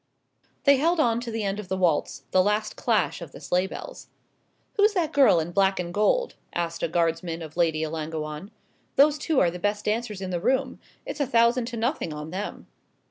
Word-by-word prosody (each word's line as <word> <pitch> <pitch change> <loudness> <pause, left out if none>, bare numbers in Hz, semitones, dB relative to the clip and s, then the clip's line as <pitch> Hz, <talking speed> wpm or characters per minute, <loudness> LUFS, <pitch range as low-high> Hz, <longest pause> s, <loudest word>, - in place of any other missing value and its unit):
They 280 -1 +6
held 330 +5 +2
on 235 -5 +3
to 240 - -5
the 225 -1 -3
end 200 +1 -2
of 210 - -7
the 190 - -2
waltz 180 -3 0
the 185 - +5
last 210 +2 0
clash - - 0
of - - -9
the - - -10
sleigh 180 +1 0
bells. - - -9 0.7
"Who's 420 -2 +4
that 335 -5 0
girl 270 -11 +6
in 165 +2 -3
black 195 +1 +2
and 175 -1 -4
gold?" 480 - +2 0.2
asked 170 -1 -2
a - - +1
Guardsman 165 0 -1
of 155 -1 -10
Lady 160 -2 +1
Ellangowan; 155 +2 -4 0.5
"those 295 +2 +5
two 305 -2 +1
are 175 - +3
the 180 - -7
best 205 +3 -1
dancers 215 -1 -1
in 190 -1 -5
the 175 -1 -2
room 260 +4 0 0.3
it's - - -6
a 285 - +1
thousand 235 0 +3
to 235 0 -5
nothing 230 - -1
on 150 +1 -7
them." 195 +3 -5
205 Hz, 205 wpm, -26 LUFS, 170-250 Hz, 0.7 s, They